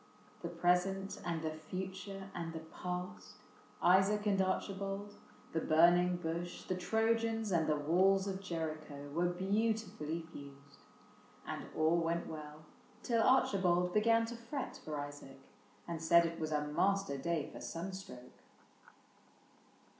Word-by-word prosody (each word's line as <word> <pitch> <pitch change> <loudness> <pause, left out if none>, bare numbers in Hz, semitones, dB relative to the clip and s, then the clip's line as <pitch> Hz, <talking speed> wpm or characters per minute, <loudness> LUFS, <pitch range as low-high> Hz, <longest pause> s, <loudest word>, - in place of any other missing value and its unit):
The 170 - -3
present 180 +3 +1
and 165 -2 -2
the 160 - -1
future 190 +4 -6
and 165 -1 -4
the 160 - -5
past, 180 - -5 0.5
Isaac 195 +4 +5
and 195 -2 +3
Archibald, 195 +1 -2 0.4
the 160 - +1
burning 175 +3 +5
bush. 175 0 -4
The - - -2
Trojans 225 +2 +1
and 165 -3 +2
the 155 - +3
walls 185 +6 +3
of 195 -1 -3
Jericho, 155 -5 -5
Were 170 +4 +1
beautifully 190 -3 -1
fused; 140 0 -12 0.7
and - - -5
all 160 +2 +4
went 170 0 0
well 155 0 -8 0.4
Till 230 -2 +2
Archibald 180 -8 +3
began 230 +2 +4
to 235 +1 -6
fret 235 +4 -5
for 150 -2 -4
Isaac 145 -2 -8 0.5
And 165 -2 -4
said 170 +1 +6
it 165 0 -3
was 155 -1 -2
a 150 -1 +1
master 190 0 +1
day 165 0 -1
for - - -8
sunstroke. 170 -8 -7
175 Hz, 130 wpm, -35 LUFS, 155-195 Hz, 0.7 s, said